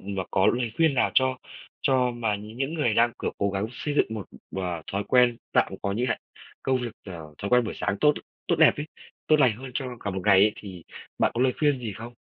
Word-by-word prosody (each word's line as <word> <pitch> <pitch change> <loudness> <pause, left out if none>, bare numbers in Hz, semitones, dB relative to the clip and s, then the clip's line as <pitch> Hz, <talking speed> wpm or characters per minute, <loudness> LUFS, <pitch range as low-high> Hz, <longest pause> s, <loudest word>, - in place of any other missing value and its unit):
mà 95 -1 -4
có 95 - +3
lời 120 -2 +1
khuyên 160 -3 +3
nào 125 - +2
cho 130 -1 +3 0.5
cho 130 -2 +3
mà 115 -3 -1
nh 105 +3 -10
những 135 +4 -2
người 145 -9 +1
đang, 120 +1 +4
kiểu, - - -1
cố 100 0 +1
gắng 100 +2 -2
xây 145 +4 -4
dựng - - +3
một, 105 -4 -6 0.3
ờ, 90 -3 -3
thói 100 +1 -1
quen 125 -2 +4 0.2
tạm - - +2
có 100 - -1
như 120 +5 -1
hạn 115 - 0 0.4
công 130 -1 +1
việc, 120 -2 -4
ờ, 80 -5 -9
thói 100 - -4
quen 125 -1 +5
buổi 110 - -4
sáng 105 -1 -2
tốt 150 -1 +5 0.3
tốt - - +3
đẹp - - +7
ấy, 145 - -4 0.4
tốt 155 - +5
lành 115 -5 +4
hơn 130 +1 -8
cho 135 - -2
cả 100 - -3
một 95 0 -3
ngày 100 -2 +6
ấy, 105 - +4
thì 95 -5 -10 0.3
bạn - - +3
có 120 - -1
lời 130 - +3
khuyên 145 -3 +2
gì 115 -4 -5
không? 115 +3 -9
115 Hz, 250 wpm, -26 LUFS, 100-130 Hz, 0.5 s, đẹp